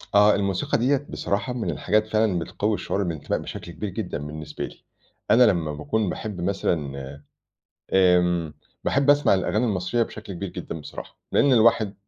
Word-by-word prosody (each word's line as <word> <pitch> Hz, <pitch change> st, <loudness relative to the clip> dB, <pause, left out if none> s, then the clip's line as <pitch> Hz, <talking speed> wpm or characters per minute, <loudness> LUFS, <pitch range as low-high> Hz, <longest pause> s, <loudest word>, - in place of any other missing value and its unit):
آه 105 Hz, +1 st, +6 dB
الموسيقى 100 Hz, +8 st, 0 dB
ديّة 135 Hz, +4 st, +1 dB
بصراحة 105 Hz, +5 st, -2 dB
من 120 Hz, -3 st, -3 dB
الحاجات 110 Hz, +1 st, +1 dB
فعلًا 110 Hz, -4 st, +1 dB
بتقوي 105 Hz, +5 st, -1 dB
الشعور 100 Hz, -1 st, -1 dB
بالإنتماء 85 Hz, -5 st, -2 dB
بشكل 85 Hz, -, -7 dB
كبير 100 Hz, +5 st, -5 dB
جدًا 95 Hz, 0 st, -4 dB
بالنسبة 75 Hz, +1 st, -6 dB
لي، -, -, -13 dB, 0.5 s
أنا 125 Hz, -, +7 dB
لمّا 85 Hz, -9 st, +2 dB
باكون 100 Hz, +8 st, -1 dB
باحب 105 Hz, -3 st, -5 dB
مثلًا، 70 Hz, -7 st, -2 dB, 0.7 s
آمم، 90 Hz, -4 st, +3 dB, 0.3 s
باحب 140 Hz, +1 st, +3 dB
أسمع 145 Hz, -7 st, +4 dB
الأغاني 100 Hz, +4 st, 0 dB
المصرية 100 Hz, +3 st, 0 dB
بشكل 110 Hz, -3 st, -6 dB
كبير 95 Hz, +2 st, -5 dB
جدًا 80 Hz, -, -6 dB
بصراحة، 75 Hz, -, -10 dB
لإن 140 Hz, -, +4 dB
الواحد 110 Hz, -3 st, +4 dB
100 Hz, 155 wpm, -24 LUFS, 85-110 Hz, 0.7 s, أنا